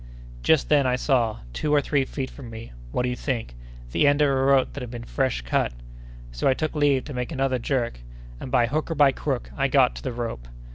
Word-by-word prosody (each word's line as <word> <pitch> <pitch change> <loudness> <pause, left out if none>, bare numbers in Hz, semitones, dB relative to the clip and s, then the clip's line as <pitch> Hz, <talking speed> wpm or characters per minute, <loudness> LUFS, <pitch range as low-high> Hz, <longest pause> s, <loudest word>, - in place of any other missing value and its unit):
Just 160 - +3
then, 145 -3 +4
I 125 - +2
saw—two 115 - -1
or 150 - +5
three 140 -1 +1
feet 130 -1 -5
from 130 -5 -10
me—what 110 - -6
do 125 - 0
you 125 - -2
think? 120 - -3 0.4
the 145 - +3
end 145 +1 +4
of 145 - +4
a - - +2
rope 135 0 +3
that 140 - -6
had 125 - -6
been 120 -1 -7
fresh 130 - -1
cut; - - 0 0.6
so - - -1
I 130 - +4
took 155 +1 -2
leave 145 -3 +2
to 145 - -8
make 125 +2 -3
another 135 -3 0
jerk, 120 - -1 0.4
and, - - -7
by 125 -2 +3
hook 155 +7 -2
or 165 - -2
by 145 -2 +6
crook, 135 -2 -3
I 135 -1 +1
got 135 -2 +4
to - - -7
the 130 - -3
rope. 115 - -5
130 Hz, 230 wpm, -25 LUFS, 120-140 Hz, 0.6 s, by